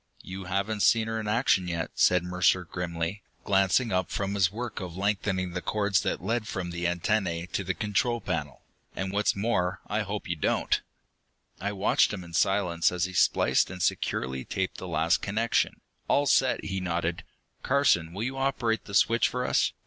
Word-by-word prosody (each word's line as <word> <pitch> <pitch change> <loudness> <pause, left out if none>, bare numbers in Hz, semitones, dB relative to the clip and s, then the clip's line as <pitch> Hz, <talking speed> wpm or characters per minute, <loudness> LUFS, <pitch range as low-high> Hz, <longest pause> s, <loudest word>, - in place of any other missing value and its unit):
"You 95 0 -7
haven't 100 +3 -1
seen 110 +2 +4
her 110 0 -2
in 110 - -4
action 105 -5 +2
yet," 85 -2 -3
said 90 -1 +3
Mercer 90 +1 +2
grimly, 85 +3 -4 0.2
glancing 95 +4 +2
up 90 -1 0
from 100 0 -2
his 95 -2 +2
work 120 +2 -5
of 90 -3 -7
lengthening 95 -2 -1
the 90 0 -4
cords 100 -1 +1
that - - -2
led 110 +2 -1
from 95 -4 -4
the 85 0 -2
antennae 85 -1 0
to 100 - -1
the 95 -1 -2
control 115 +3 0
panel. 75 - -4 0.3
"And 95 0 -3
what's 105 +1 +2
more, 95 -3 0
I 105 - -1
hope 105 0 -4
you 85 - -1
don't." 75 - +1 0.8
I 100 +2 -2
watched 100 0 +3
him 95 -3 -5
in 85 -1 -12
silence 90 -2 +2
as 90 -1 0
he 95 - -6
spliced 85 - +3
and 90 0 -8
securely 65 -4 -1
taped - - -3
the - - -7
last 80 +2 +1
connection. 110 +4 0 0.3
"All 145 - +3
set," 130 -1 +3
he 95 -1 -2
nodded. 85 -1 -2 0.4
"Carson, 130 -12 +2
will 100 +5 -4
you 135 +2 -3
operate 120 -4 0
the 100 - -6
switch 115 +4 +4
for 125 0 -2
us? - - +2
95 Hz, 185 wpm, -28 LUFS, 90-105 Hz, 0.8 s, seen